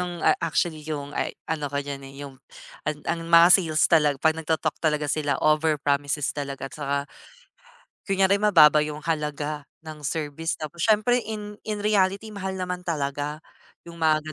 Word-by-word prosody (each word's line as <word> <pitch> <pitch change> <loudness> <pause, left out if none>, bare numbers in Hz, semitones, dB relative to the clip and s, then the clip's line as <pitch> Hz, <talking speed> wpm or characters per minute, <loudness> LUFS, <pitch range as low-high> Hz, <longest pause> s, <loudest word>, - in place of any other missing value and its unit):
yung 175 -1 -4 0.2
actually, 165 -1 -1
yung, 145 -2 -5
ay - - -1 0.2
ano 150 -3 -2
ka 140 +1 -2
diyan, 140 -1 -5
eh, - - -13
yung 140 -1 -10 0.5
an 150 -1 -3
ang 170 0 -1
mga 170 0 +8
sales 155 -4 +1
tala 155 -3 +5
'pag 160 0 +3
nagto-talk 160 -1 -1
talaga 150 -2 0
sila, 145 -1 0
over 155 0 +3
promises 145 0 0
talaga 140 -2 -5
at - - -14
saka 140 -2 -2 1.1
kunyare, 195 +1 +3
mababa 155 -8 +6
yung 150 0 -4
halaga 150 -2 -3 0.2
ng 155 -1 -9
service, 160 +2 -2
tapos 155 +2 -7
siyempre 225 +3 +3
in 210 -1 -6
in 210 -1 -3
reality, 200 +1 +1
mahal 190 -2 -4
naman 180 -1 -3
talaga 145 -1 -3 0.4
yung 170 0 -11
mga 155 -1 +1
155 Hz, 165 wpm, -25 LUFS, 150-180 Hz, 1.1 s, mga